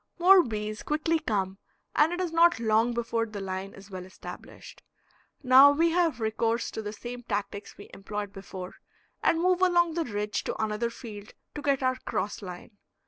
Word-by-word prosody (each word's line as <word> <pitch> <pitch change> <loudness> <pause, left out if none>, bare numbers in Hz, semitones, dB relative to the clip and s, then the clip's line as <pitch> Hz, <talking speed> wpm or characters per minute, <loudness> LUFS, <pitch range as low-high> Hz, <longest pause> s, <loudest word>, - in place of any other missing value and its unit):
More 370 +2 +7
bees 215 -5 -4
quickly 315 +2 0
come, 195 -6 -2 0.4
and 310 +2 +4
it 350 - -3
is 360 -3 -1
not 340 -1 +4
long 225 +1 +2
before 230 -1 -1
the 215 -2 -7
line 190 0 -5
is 195 +1 -14
well 185 -1 -6
established. 185 - -11 0.6
Now 260 +2 +8
we 330 +3 +2
have 335 -5 +1
recourse 225 +1 -1
to - - -5
the 210 -1 -5
same 240 +3 -7
tactics 205 -3 -4
we 200 - -11
employed 205 0 -5
before, 190 -1 -8 0.4
and 325 - +2
move 365 +1 +2
along 345 -2 +3
the 335 0 -1
ridge 210 -2 -2
to - - -2
another 220 +2 -1
field 215 -3 -10 0.2
to 295 - -6
get 280 -2 +1
our 255 0 +1
cross 215 -5 -3
line. 190 +2 -10
230 Hz, 180 wpm, -28 LUFS, 205-305 Hz, 0.6 s, Now